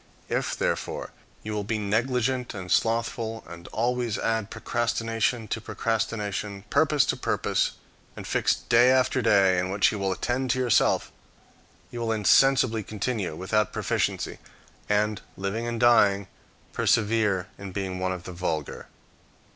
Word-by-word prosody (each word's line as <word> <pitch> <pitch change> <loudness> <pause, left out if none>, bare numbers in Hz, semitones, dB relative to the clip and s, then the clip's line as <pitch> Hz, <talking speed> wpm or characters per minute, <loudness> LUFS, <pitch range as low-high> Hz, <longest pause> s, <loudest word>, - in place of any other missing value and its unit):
If, - - -1
therefore, - - -2 0.3
you 110 - -4
will 105 -1 -2
be 110 +2 -2
negligent 125 +4 0
and 90 -3 -6
slothful, 115 0 0
and 85 +1 -11
always 120 -1 -1
add 110 -2 -1
procrastination 115 0 -1
to 115 - -2
procrastination, 105 -3 -2
purpose 145 0 +3
to - - 0
purpose, - - 0 0.4
and - - -8
fix - - +1
day 120 +1 +4
after 130 0 +3
day 100 -5 +4
in 90 +1 -1
which 100 +1 +3
you 105 - -4
will 95 -1 0
attend 125 +6 -1
to 130 +1 +1
yourself, 120 -5 +2 0.8
you 120 - -6
will 115 -1 -1
insensibly 115 +2 +4
continue 105 -3 -3
without 105 +4 0
proficiency, - - -1 0.5
and, 105 0 +1 0.2
living 100 +5 -3
and 120 -1 -3
dying, 105 -5 +4 0.5
persevere 105 -4 +1
in 100 -1 -7
being 95 -1 -4
one 95 0 -1
of 90 -1 -5
the 90 - -8
vulgar. 80 -4 -3
110 Hz, 140 wpm, -26 LUFS, 100-120 Hz, 0.8 s, day